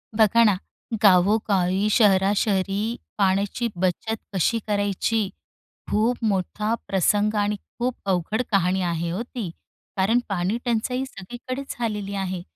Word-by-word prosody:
बघा 225 +1 +5
ना, 210 -4 +4 0.5
गावो-गावी 195 0 +3
शहरा-शहरी 195 -1 +3 0.4
पाण्याची 200 +4 +1
बचत 185 +5 -1 0.2
कशी 195 +5 +1
करायची? 205 +1 0 0.6
खूप 225 +4 +2
मोठा 210 +2 0
प्रसंग 205 +3 +2
आणि 210 +1 0 0.2
खूप 245 +1 0
अवघड 190 +4 0
कहाणी 190 -1 +2
आहे 170 0 -2
हो 185 - -2
ती, 235 -6 -5 0.5
कारण 220 +6 +3
पाणी 195 +3 0
टंचाई 250 +2 0
सगळीकडेच 255 +5 -7
झालेली 210 -4 -2
आहे. 190 -2 -3
205 Hz, 115 wpm, -24 LUFS, 190-225 Hz, 0.6 s, बघा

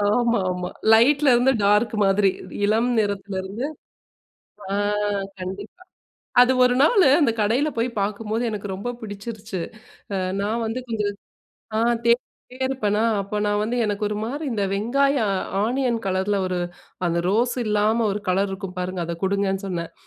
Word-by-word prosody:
ஆமா, 240 -2 +2
ஆமா. 180 0 -4 0.2
லைட்‌ல 275 +5 +5
இருந்து 250 +2 +4
டார்க் 210 +3 +3
மாதிரி 195 0 +4 0.4
இளம் 220 +4 +2
நிறத்துல 200 -1 -2
இருந்து, 205 +7 -4 1.1
ஆ - - -1 0.7
கண்டிப்பா. 195 - -7 0.6
அது 250 +1 +6
ஒரு 250 0 +3
நாளு 375 - +5
அந்த 280 -6 +4
கடையில 235 +8 +2
போய் 230 +2 +1
பார்க்கும்போது 215 +3 -2
எனக்கு 205 -1 -5
ரொம்ப 205 +6 -4
பிடிச்சிருச்சு. 210 -2 -6 0.5
அ - - 0 0.3
நான் 225 +3 -1
வந்து 225 +3 -3
கொஞ்சம் 210 -3 -1 0.6
ஆ - - +1 0.3
தேடிட்டே 240 +1 -1
இருப்பன்னா! 215 -5 0 0.2
அப்ப 200 +2 -4
நான் 205 0 +1
வந்து 235 +3 -2
எனக்கு 205 -1 -2
ஒருமாரி 225 +9 -3
இந்த 205 -3 0
வெங்காயம் 240 0 +1 0.3
ஆனியன் 245 0 0
கலர்ல 190 +2 0
ஒரு 180 -1 -2 0.5
அந்த 170 0 0
ரோஸ் 235 +4 +1
இல்லாம 215 +2 +2
ஒரு 205 - -2
கலர் 195 +2 +1
இருக்கும் 190 -1 -6
பாருங்க, 180 0 -3
அத 170 - -3
குடுங்கன்னு 195 0 0
சொன்னேன். 170 -3 -4
210 Hz, 145 wpm, -23 LUFS, 200-240 Hz, 1.1 s, அது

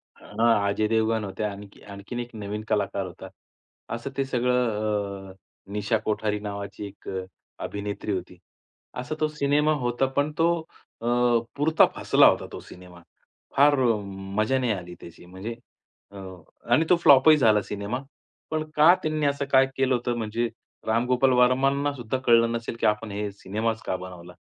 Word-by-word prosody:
हां, 115 -3 +1
अजय 105 +2 0
देवगण 110 0 +1
होते, 95 +2 -5
आणखी 100 -1 -6
आणखीन 100 +4 -8
एक 120 0 -5
नवीन 105 0 -5
कलाकार 100 -2 -1
होता. 90 - -10 0.7
असं 120 +4 -6
ते 135 - +1
सगळं 105 -6 -1
अ, - - -13 0.4
निशा 105 +2 0
कोठारी 105 -1 -1
नावाची 100 0 -6
एक 100 - -12 0.5
अभिनेत्री 100 +1 -4
होती. 90 -1 -4 0.6
असा 125 +5 -4
तो 155 - +2
सिनेमा 150 +1 +1
होता. 120 +2 +1
पण 145 +3 -1
तो 165 +1 +3 0.5
अ, - - -6 0.5
पुरता 155 +3 +4
फसला - - +5
होता - - +2
तो - - -7
सिनेमा. 90 -1 -14 0.6
फार 145 +1 +6 0.6
मजा 130 +5 +2
नाही 125 -3 0
आली 90 -3 -5
त्याची. 85 +1 -13
म्हणजे 95 +6 -7 0.6
अ, 100 - -11 0.5
आणि 155 +7 +4
तो 180 - +7
फ्लॉपही 155 -1 +7
झाला 110 -6 +4
सिनेमा. 105 +6 -4 0.5
पण 155 0 0
का 155 +4 +7
त्यांनी 155 -1 -1
असं 140 0 0
काय 135 0 +6
केलं 135 -1 +2
होतं? 120 0 -2
म्हणजे 115 +1 -2 0.4
रामगोपाल 125 +3 +2
वर्मांनासुद्धा 130 0 +2
कळलं 115 -1 +5
नसेल, 115 0 -4
की - - 0
आपण 105 0 0
हे 105 0 -3
सिनेमाच 110 +3 -3
का 95 - -1
बनवला? 90 -1 -10
115 Hz, 150 wpm, -25 LUFS, 100-135 Hz, 0.7 s, तो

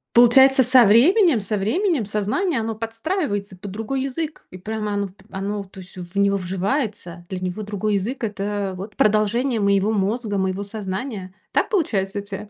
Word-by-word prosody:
Получается 265 +3 +7
со 250 0 +6
временем, 295 - +5
со 210 +2 -2
временем 270 - 0
сознание 215 - -1
оно 225 0 -3
подстраивается 225 - -3
под 200 +2 -8
другой 225 +6 -3
язык. 300 +4 -4
И 185 - -9
прямо 210 +2 -4
оно 200 0 -1
в - - -16 0.2
оно 200 +1 -3
то 190 0 -14
есть 185 -1 -12
в 180 +1 -8
него 200 0 +3
вживается. 190 - -3
Для 185 - -4
него 185 +3 -4
другой 210 0 -2
язык- 230 +7 -3
это 205 -2 -2
вот 200 +3 -8
продолжение 215 +4 +2
моего 200 +1 +2
мозга, 210 +1 -1
моего 190 +1 -1
сознания. 200 -1 -5 0.2
Так - - +1
получается 205 - 0
у - - -4
тя? 200 +1 -8
210 Hz, 175 wpm, -22 LUFS, 195-240 Hz, 0.2 s, Получается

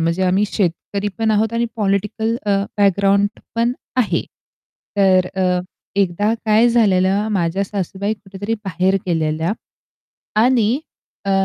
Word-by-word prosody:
म्हणजे 165 +3 0
आम्ही 190 +3 +3
शेतकरी 200 +2 -1
पण 225 -1 +1
आहोत 215 +1 +2
आणि 235 0 +1
पॉलिटिकल 210 +2 0
अ, 200 -1 +2 0.2
बॅकग्राऊंड 200 0 +3 0.3
पण 235 +1 +1 0.2
आहे. 250 -4 +1 0.7
तर 190 -2 +4
अ, 180 -1 +1 0.4
एकदा 200 +3 +1
काय 220 +2 +4
झालेलं 200 -3 +3
माझ्या 180 0 0
सासूबाई 200 +1 -3
कुठेतरी 200 +1 -5
बाहेर 185 +1 +1
गेलेल्या 160 0 0 0.9
आणि 245 +1 +3 0.4
अ, 195 - -1
200 Hz, 120 wpm, -19 LUFS, 185-215 Hz, 0.9 s, तर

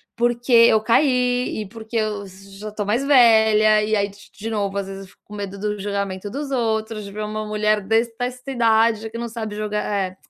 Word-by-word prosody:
porque 240 +1 -1
eu 230 -2 +7
caí, 250 0 +1
e - - -11
porque 225 +2 -7
eu 210 -2 -2
já 195 +2 -11
tô 210 0 -4
mais 225 +6 0
velha, 220 -5 +5
e 215 +1 -2
aí 200 -1 +1
de 200 +1 -17
de 220 +2 -7
novo, 200 -3 -2
às 200 -1 -3
vezes 195 0 -7
eu - - -13
fico - - -28
com 210 - -11
medo 200 -1 -6
do 210 +1 -2
julgamento 200 -1 -3
dos 280 +6 -5
outros, 220 -3 -1
de 200 - -9
ver 215 +1 -5
uma 215 0 -4
mulher 210 0 +1
des 225 +4 +1
desta 250 +2 -4
idade 225 -2 +2
que 230 - -6
não 235 0 -4
sabe 220 -2 -6
joga 210 0 -3
eh, 195 -3 -2
215 Hz, 215 wpm, -21 LUFS, 205-230 Hz, -, eu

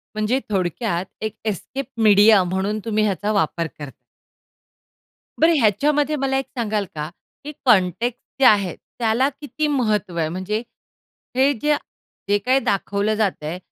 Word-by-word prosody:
म्हणजे 215 +5 +1
थोडक्यात 185 -1 -1 0.2
एक 215 0 -3
एस्केप 255 +7 -3 0.2
मीडिया 205 -1 +6
म्हणून 190 +4 -2
तुम्ही 215 -1 +1
ह्याचा 205 0 0
वापर 170 -4 0
करताय. 145 -2 -7 1.5
बरं 330 +1 +5
ह्याच्यामध्ये 290 +8 +2
मला 270 -1 0
एक 270 - -1
सांगाल 215 -3 -1
का? 150 0 -4 0.3
की 295 - -6
कन्टेक्सट 220 +2 +2 0.2
जे 270 - +5
आहे. 200 -6 +4
त्याला 235 +4 -1
किती 295 +2 -4
महत्व 215 -10 0
आहे? 160 -1 0
म्हणजे 185 +5 -2 0.8
हे 270 +2 +4
जे, 295 +4 +1 0.5
जे 205 - +4
काही 255 +5 +2
दाखवलं 200 0 0
जातंय, 180 -6 -1
215 Hz, 135 wpm, -21 LUFS, 190-260 Hz, 1.5 s, मीडिया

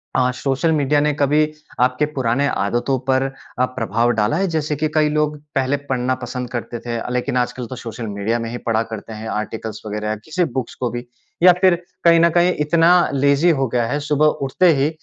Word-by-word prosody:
अ, 125 -1 +3
social 135 +5 0
media 145 -1 +2
ने 150 0 +1
कभी 145 +1 +3 0.4
आपके 125 +4 +2
पुराने 130 +2 +1
आदतों 120 0 0
पर 130 0 +3 0.4
अ, 125 - +4
प्रभाव 120 -2 -1
डाला 105 +7 +1
है? 195 - +1
जैसे 155 -3 -1
कि 155 +2 0
कई 155 -1 +3
लोग 150 0 0 0.2
पहले 135 +1 +1
पढ़ना 130 0 0
पसंद 125 0 -5
करते 120 -1 -5
थे 120 0 -4
अ, 115 - -5
लेकिन 125 +1 -1
आजकल 125 0 -1
तो 130 - -7
सोशल 115 -1 -7
मीडिया 105 +3 -1
में 115 0 -4
ही 120 - -5
पढ़ा 115 0 +2
करते 110 +1 -7
हैं, 110 +1 -7
आर्टिकल्स 110 0 -4
वग़ैरह 105 0 -4
या 110 - -1
किसी 175 +3 0 0.2
बुक्स 125 - -7
को 125 - -2
भी। 120 0 -5 0.4
या 180 - +10
फिर 185 -2 +5 0.3
कहीं 170 -1 +6
न 170 +1 +5
कहीं 175 +2 +3
इतना 165 +2 +4 0.2
लेज़ी 140 +4 +3
हो 135 - +1
गया 120 0 0
है, 145 - -1
सुबह 150 0 +1 0.2
उठते 135 +7 +2
ही 140 +2 +2
130 Hz, 210 wpm, -20 LUFS, 120-150 Hz, 0.4 s, या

